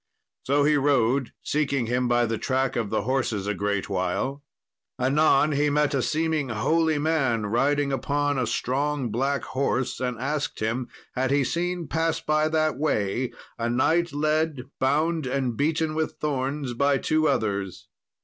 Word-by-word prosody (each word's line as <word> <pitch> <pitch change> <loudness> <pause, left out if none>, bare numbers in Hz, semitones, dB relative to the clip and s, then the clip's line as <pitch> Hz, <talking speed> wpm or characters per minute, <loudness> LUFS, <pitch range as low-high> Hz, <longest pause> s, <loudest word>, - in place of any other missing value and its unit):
So 140 +2 +2
he 150 +1 +4
rode, 135 -2 +2
seeking 140 -4 0
him 125 +2 0
by 120 0 +3
the 115 -1 -2
track 130 0 0
of 115 -4 -1
the - - 0
horses 120 -5 -1
a 105 - 0
great 100 -1 -1
while. 100 +9 -2 0.6
Anon 145 +3 +3
he 145 +1 +2
met 150 0 +1
a 135 - +1
seeming 155 -1 0
holy 155 +8 +1
man 140 -8 +1
riding 140 +6 +1
upon 145 +1 0
a 125 - 0
strong 140 -1 -1
black 135 +4 0
horse, 130 -1 -1
and 125 -2 -2
asked 145 +4 -2
him, 115 +3 -1 0.3
had 130 +1 0
he 140 0 +3
seen 175 +3 -2
pass 165 0 0
by 155 0 +1
that 155 -3 0
way 120 -4 0 0.3
a 115 0 0
knight 165 +8 +2
led 155 -1 0 0.2
bound 155 +3 +1
and 130 -2 -1
beaten 155 +3 0
with 160 0 -1
thorns 140 -2 -2
by 140 +3 +2
two 155 +3 +1
others. 100 -4 -1
140 Hz, 160 wpm, -25 LUFS, 120-150 Hz, 0.6 s, he